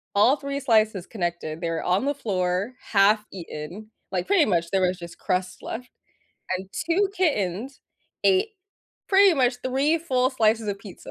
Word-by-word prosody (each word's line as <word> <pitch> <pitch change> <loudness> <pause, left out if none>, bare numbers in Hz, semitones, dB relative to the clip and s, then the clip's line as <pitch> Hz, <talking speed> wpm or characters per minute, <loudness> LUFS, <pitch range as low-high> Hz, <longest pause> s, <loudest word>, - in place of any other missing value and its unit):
all 240 +8 +5
3 280 0 -4
slices 215 -7 +2
connected, 175 -6 -3
they 170 - -1
were 165 0 -2
on 185 +8 +1
the 285 - +1
floor, 190 -1 -1
half 210 +1 +3
eaten, 180 +4 -8 0.2
like, 180 - -1
pretty 390 -6 +4
much 170 -4 0
there 190 -1 +2
was 180 0 +1
just 170 -1 -10
crust 185 -1 -2
left, 250 +2 -6 0.7
and 190 0 -9
2 370 +5 +1
kittens 255 - -1 0.4
ate 385 +3 +4 0.6
pretty 390 0 +6
much 250 -3 +2
3 270 +5 +2
full 260 -6 +1
slices 225 -3 +2
of 200 - -2
pizza. 200 -4 -11
215 Hz, 160 wpm, -25 LUFS, 185-275 Hz, 0.7 s, pretty